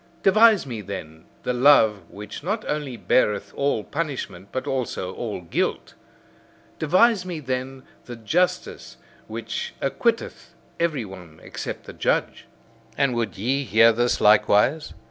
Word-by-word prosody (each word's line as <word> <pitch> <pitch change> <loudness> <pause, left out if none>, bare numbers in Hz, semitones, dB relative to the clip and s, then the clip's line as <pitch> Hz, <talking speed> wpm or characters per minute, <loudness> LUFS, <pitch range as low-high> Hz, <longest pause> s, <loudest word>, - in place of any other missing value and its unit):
Devise 215 -1 +5
me, 120 -5 -5
then, 80 -5 -8 0.2
the 125 - -1
love 120 -6 +4
which 105 +1 -9
not 210 +6 -2
only 145 -5 -3
beareth 105 -5 +1
all 140 -6 0
punishment, 140 - -5
but 130 - -3
also 120 -8 -3
all 110 -6 -5
guilt! 85 - -2 0.9
Devise 185 +6 +3
me, 180 -3 -5
then, 130 -1 -4 0.2
the 120 - -8
justice 115 - -1 0.3
which 115 +1 -5
acquitteth - - -2 0.2
every 155 -8 0
one 90 -5 -12
except - - -6
the - - -10
judge! - - -1 0.5
And 140 -3 +2
would 120 -1 -2
ye 130 +8 0
hear 115 -1 +5
this 120 +2 +1
likewise? 110 +8 +3
125 Hz, 130 wpm, -23 LUFS, 105-150 Hz, 0.9 s, Devise